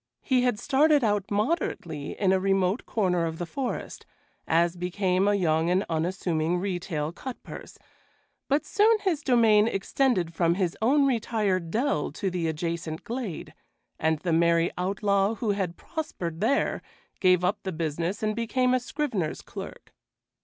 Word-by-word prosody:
He 255 -2 +2
had 245 -4 +1
started 290 +4 +3
out 205 -3 +1
moderately 205 - -2
in 195 -2 +3
a 190 - +3
remote 195 +2 +1
corner 180 -6 +1
of 160 0 -5
the 175 - -3
forest, 255 +8 -4 0.4
as 170 +1 +2
became 185 +2 0
a 205 - +3
young 165 -3 +1
and 185 +3 +2
unassuming 165 0 0
retail 175 -5 -2
cut 255 +8 -8
purse, - - -10 0.7
but 285 +2 +1
soon 435 +2 +4
his 350 -7 0
domain 225 -5 +4
extended 195 -4 0
from 170 0 +2
his 180 -3 -1
own 275 +5 +4
retired 215 -8 0
dell 215 - 0
to 190 +4 -2
the 175 -2 -1
adjacent 165 0 -3
glade, 235 -7 -5 0.5
and 160 0 +2
the 170 -3 0
merry 170 +1 +3
outlaw 200 +3 +1
who 220 -2 -1
had 190 -4 -2
prospered 185 - -5
there 260 +6 +1 0.4
gave 185 -1 +4
up 195 +4 +1
the 190 - -4
business 170 +5 -3
and 215 0 0
became 250 +2 +1
a 255 - +3
scrivener's 245 - -3
clerk. - - -9
190 Hz, 155 wpm, -27 LUFS, 170-230 Hz, 0.7 s, soon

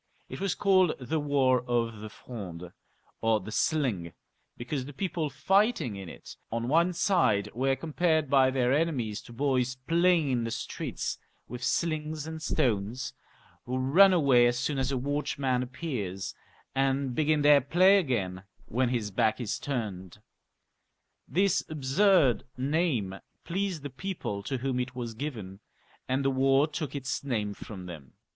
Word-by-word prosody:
It - - -7
was 195 -3 0
called 185 -4 +4
the 150 +5 -2
war 135 -4 +2
of 115 -2 0
the 110 +1 -7
Fronde, 90 -8 -8 0.5
or 115 -1 +3
the 105 +2 -8
sling, 115 - 0 0.4
because 130 +2 -4
the 145 - -9
people 165 -1 -2
fighting 195 - +1
in 95 -3 -7
it - - -11 0.2
on 115 +1 -2
one 170 +6 +3
side 165 - +2
were 135 +3 +1
compared 160 0 0
by 135 -1 +4
their 130 -1 +1
enemies 135 -9 0
to - - -14
boys 130 0 0
playing 170 -3 +3
in 120 -2 0
the 115 - -2
streets - - -4 0.3
with 125 0 -7
slings 155 -1 -1
and 160 0 -6
stones, 120 -6 -1 0.5
who 125 +1 -2
run 160 +10 +6
away 135 -9 +5
as 120 0 0
soon 135 +3 -1
as 130 +1 0
a 135 - 0
watch 145 +4 -2
man 130 -3 +1
appears, 120 - -4 0.4
and 135 -1 +1
begin 155 +2 +2
their 145 -1 +7
play 185 +8 +5
again 100 - -2 0.2
when 125 +2 0
his 115 -4 -2
back 110 +4 +1
is 120 -5 -3
turned. 105 -9 -4 1.1
This 195 +1 +2
absurd 150 - +3
name 130 - 0 0.2
pleased 185 -3 -2
the 145 - -5
people 135 - -4
to 135 +6 -3
whom 130 0 -1
it 125 0 -3
was 120 -2 -4
given, 110 -7 -6 0.5
and 135 +1 0
the 135 - +3
war 135 +2 +4
took 155 -1 -5
its 135 0 -3
name 110 -7 -2
from 95 -3 -9
them. 80 -7 -10
130 Hz, 155 wpm, -29 LUFS, 115-155 Hz, 1.1 s, their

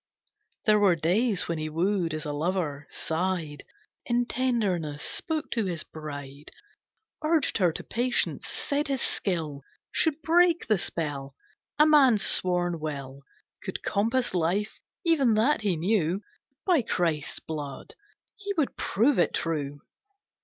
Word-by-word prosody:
There 210 -1 +5
were 195 -4 +5
days 190 +6 +1
when 170 -2 -2
he 155 0 -3
wooed 170 0 0
as 155 +1 -5
a 150 - -3
lover, 150 -2 -2
sighed 165 -3 -2 0.4
In 240 0 +1
tenderness, 200 - 0
spoke 315 -2 -2
to 225 -4 0
his 170 -4 -3
bride, 145 -2 -8 0.7
Urged 310 -6 +2
her 180 -3 +4
to - - -6
patience, 245 +2 -1
said 290 0 -1
his 270 -2 -1
skill 160 -7 -1 0.3
Should 320 -2 +1
break 340 +1 +4
the 215 -4 +2
spell. 145 -6 -3 0.4
A 300 - +7
man's 270 -9 +5
sworn 175 -2 +1
will 140 -3 -5 0.4
Could - - -5
compass 230 +4 +1
life, 185 +5 0 0.3
even 280 -9 +4
that, 230 +5 +3
he 200 -4 +1
knew. 185 +1 +1 0.4
By 350 -7 +4
Christ's 165 -9 -1
Blood! 150 - -6 0.4
He 405 -1 -4
would 300 -4 +1
prove 230 +3 +2
it - - +2
true! 145 -3 -2
185 Hz, 135 wpm, -27 LUFS, 155-245 Hz, 0.7 s, A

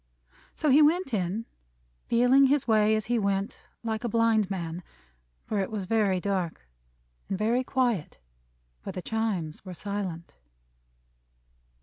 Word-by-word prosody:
So 300 - +1
he 290 +4 +7
went 310 -1 +3
in, 200 +3 -1 0.6
feeling 250 +3 +5
his 280 -1 +1
way 215 -1 +4
as 215 -2 -1
he 240 0 +1
went, 200 0 -2 0.2
like 220 -1 -2
a 240 - -1
blind 225 -2 +2
man; 170 -3 -4 0.6
for 210 - -1
it 190 - -1
was 210 -3 -4
very 200 -3 +2
dark. 180 - -3 0.6
And 195 - -1
very 230 +5 +1
quiet, 245 - -1 0.6
for - - -6
the 185 - -6
Chimes 205 -9 -2
were 185 -2 -8
silent. 185 - -5
215 Hz, 135 wpm, -27 LUFS, 185-235 Hz, 0.6 s, he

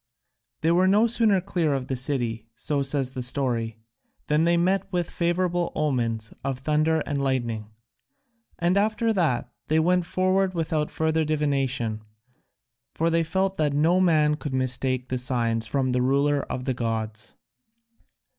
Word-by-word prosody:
They 165 - +2
were 180 +2 +4
no 205 +4 +4
sooner 225 -4 +2
clear 175 -6 0
of 130 -2 -3
the 130 - -3
city, 120 -4 -1
so 145 -2 -1
says 135 -1 0
the 130 - -5
story, 120 -3 -1 0.5
than 150 +2 +2
they 170 0 +3
met 190 +2 +1
with 175 -3 -1
favourable 175 0 0
omens 115 -7 -1
of 135 -1 -2
thunder 155 +3 +1
and 140 -1 -2
lightning, 120 -5 -1 0.9
and 175 +3 +1
after 220 +2 +1
that 165 - 0 0.2
they 155 - +2
went 180 +2 +2
forward 185 +1 +1
without 155 -2 -1
further 160 0 0
divination, 135 -7 -1 0.9
for 165 +1 +1
they 165 0 +2
felt 190 +3 -1
that 150 -2 +1
no 165 +5 +3
man 155 -4 +3
could 145 -3 -4
mistake 130 -1 0
the 130 - -1
signs 115 -3 0
from 130 +1 0
the 125 0 +1
Ruler 140 +2 +1
of 125 - -3
the 130 - 0
gods. 110 -2 -4
150 Hz, 155 wpm, -25 LUFS, 125-170 Hz, 0.9 s, were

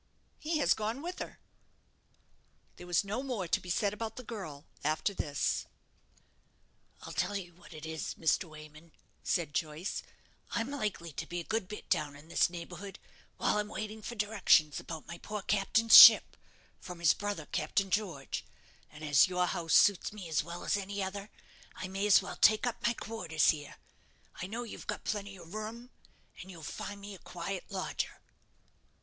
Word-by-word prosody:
"He 315 +1 -1
has 295 - +4
gone 220 +6 -3
with 355 +2 -5
her." - - -6 1.4
There 180 - -10
was 175 +1 +2
no 210 +5 -3
more 245 -9 -3
to - - +2
be 180 - -10
said 200 +3 +1
about 225 +1 -5
the 255 - -8
girl 185 -11 -7 0.2
after 155 +7 0
this. 145 -6 -1 1.4
"I'll - - -7
tell 205 - -1
you 180 -3 -5
what 175 +2 -17
it 155 -1 -8
is, 160 0 -4
Mr. 165 +3 +1
Wayman," 155 0 -13 0.3
said 160 -4 0
Joyce, 160 +4 -2 0.5
"I'm 235 +3 -1
likely 210 - -3
to 160 - -5
be 175 - -4
a - - -4
good 220 0 -2
bit 210 - -8
down 145 -1 0
in 145 +3 -15
this 170 - +3
neighbourhood, 175 +3 -8 0.4
while 210 - +1
I'm 210 - -1
waiting 215 +1 -5
for 240 - -6
directions 205 -8 +3
about 160 -2 -7
my 170 0 -8
poor 210 -2 -5
captain's 210 +3 +4
ship - - +10 0.4
from 180 -1 -8
his 170 -3 +5
brother 205 -6 -4
Captain 190 +7 -1
George, 175 -9 -2 0.5
and 150 +1 -12
as 145 0 +5
your 180 -1 +1
house 165 -2 0
suits 200 -3 +5
me 205 -4 -8
as 155 -2 +1
well 170 +2 -7
as - - +2
any 200 0 -3
other, 200 +2 -5 0.5
I - - -5
may 195 +2 -1
as 205 - +6
well - - -7
take 215 +2 +5
up 245 - -2
my 235 - +2
quarters 175 -10 +1
here. 145 -2 -8 0.7
I 180 - -3
know 230 +5 -4
you've 230 - -9
got - - -3
plenty 200 -2 -3
of 170 0 -12
room, 225 +4 -6 0.5
and 190 - -11
you'll 170 -4 -10
find 200 +6 -6
me 200 0 -8
a 190 - -11
quiet 180 +2 -5
lodger." 190 -2 -3
190 Hz, 180 wpm, -32 LUFS, 165-210 Hz, 1.4 s, ship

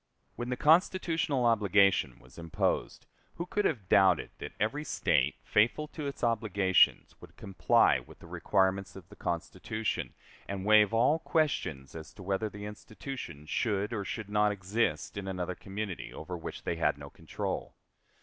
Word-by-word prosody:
When 120 +1 -5
the 125 - -2
constitutional 160 -4 +2
obligation 100 - +3
was 65 +5 -16
imposed, 85 -2 -2 0.3
who 170 - -4
could 205 +3 -1
have 110 - -1
doubted 95 -3 +4
that - - -7
every 140 +9 -1
State, 80 - +1
faithful 120 +8 +2
to 150 -3 -5
its 140 - -7
obligations, 100 -5 +3
would - - -15
comply 95 -2 +3
with - - -15
the - - -15
requirements 95 -1 0
of 95 -4 -11
the - - -13
Constitution, 110 -1 -3 0.3
and 100 -1 -4
waive 105 -1 +6
all 125 +8 +3
questions 150 - -1
as 80 -1 -10
to 95 - -11
whether 100 +3 -1
the 105 0 -8
institution 105 - -8
should 105 +4 -1
or 105 -3 -2
should 110 +1 -5
not 105 0 +3
exist 100 -3 -2
in 100 -1 -5
another 90 -1 -3
community 100 0 -6
over 90 +3 -7
which 85 - -7
they 85 - -2
had 80 - +1
no - - -10
control? - - -5
105 Hz, 160 wpm, -30 LUFS, 95-120 Hz, 0.3 s, waive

